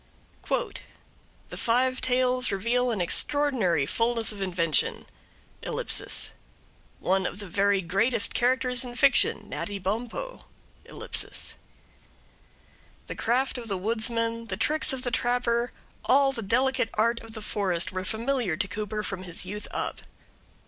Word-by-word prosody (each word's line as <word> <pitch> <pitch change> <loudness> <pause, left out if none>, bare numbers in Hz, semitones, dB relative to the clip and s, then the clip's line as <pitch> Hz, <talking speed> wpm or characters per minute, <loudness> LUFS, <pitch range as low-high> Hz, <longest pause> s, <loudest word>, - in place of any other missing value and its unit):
The - - -7
five 255 +2 +2
tales 255 -1 +2
reveal 235 +6 +1
an 215 -6 0
extraordinary 210 - +2
fulness 230 - 0
of 205 -2 -7
invention.... 170 -5 +1 0.6
One 190 0 -3
of - - -6
the 205 - -5
very 200 +1 +2
greatest 200 +7 +2
characters 250 +1 +2
in 245 -1 -7
fiction, 275 +3 +3
Natty 205 -1 -3
Bumppo.... 230 - -4 0.4
The - - -3 1.6
craft 255 +2 +1
of 235 - -8
the 195 -3 -1
woodsman, 230 +2 0
the - - -3
tricks 310 0 +2
of 260 -1 -3
the 245 - 0
trapper, 240 0 +1 0.3
all 275 +1 +5
the 250 -4 -4
delicate 235 +3 +2
art 230 +2 +2
of 225 -1 -12
the 220 - -5
forest, 185 -5 0
were 185 0 -3
familiar 225 -3 0
to 190 - 0
Cooper 210 +2 -3
from 195 -3 -4
his 175 -1 -3
youth 205 +2 -6
up. - - -3
230 Hz, 130 wpm, -27 LUFS, 195-250 Hz, 1.6 s, all